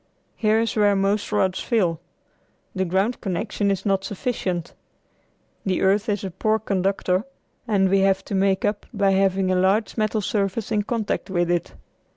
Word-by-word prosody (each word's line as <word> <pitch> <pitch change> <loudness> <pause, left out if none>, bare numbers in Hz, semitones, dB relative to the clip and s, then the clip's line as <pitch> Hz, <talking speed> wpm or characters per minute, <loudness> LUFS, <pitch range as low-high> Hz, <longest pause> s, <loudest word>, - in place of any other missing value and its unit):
Here 215 0 +2
is 230 0 -1
where 205 -2 +4
most 200 +2 0
rods 185 -1 +1
fail. 180 -9 0 0.7
The 190 -1 -1
ground 190 +7 0
connection 200 +2 -1
is 195 0 -1
not 195 -1 +1
sufficient. 185 -5 -3 0.9
The 190 -2 0
earth 205 +4 +2
is 205 -1 -1
a 190 - -4
poor 215 +5 +1
conductor, 195 -2 0 0.4
and 200 -3 +3
we 195 +1 +3
have 195 0 +2
to - - -6
make 190 0 +2
up 205 0 -2
by 200 -4 +2
having 190 -1 +2
a - - +2
large 195 +6 +1
metal 215 0 0
surface 200 +2 -1
in 210 -1 +2
contact 220 -1 -2
with 175 -2 0
it. 175 -1 -2
195 Hz, 170 wpm, -23 LUFS, 190-210 Hz, 0.9 s, where